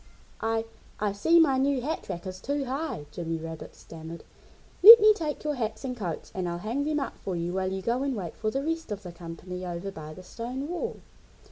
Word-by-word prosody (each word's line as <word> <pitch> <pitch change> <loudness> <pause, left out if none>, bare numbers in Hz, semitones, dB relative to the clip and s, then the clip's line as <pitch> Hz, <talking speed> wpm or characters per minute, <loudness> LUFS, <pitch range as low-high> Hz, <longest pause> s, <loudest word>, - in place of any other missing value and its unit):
"I 225 0 0 0.3
I 210 -1 +1
see 325 +13 +4
my 275 -5 +4
new 275 0 +2
hat 305 -1 -4
rack 175 -1 -5
is 185 0 -6
too 285 0 -1
high," 265 - -3
Jimmy 165 -1 -3
Rabbit 160 0 -8
stammered. 165 +1 -10 0.6
"Let 455 +5 +13
me 430 0 +7
take 315 -7 -4
your 300 -1 0
hats 230 -2 -3
and 250 -1 -3
coats 180 -9 -5
and 185 -2 -2
I'll 170 - -3
hang 230 +10 -2
them 300 0 0
up 275 - -5
for 190 - -4
you 170 +1 -2
while 190 0 -1
you 190 0 -4
go 240 +4 0
and 275 -2 -1
wait 180 -6 -5
for 215 - -1
the 270 +5 -2
rest 325 -4 -3
of 205 0 -4
the 180 - -7
company 175 +2 -8
over 180 +2 -4
by 155 -3 -9
the 185 - -11
stone 245 +8 -5
wall!" 355 +8 -3
215 Hz, 225 wpm, -28 LUFS, 175-280 Hz, 0.6 s, Let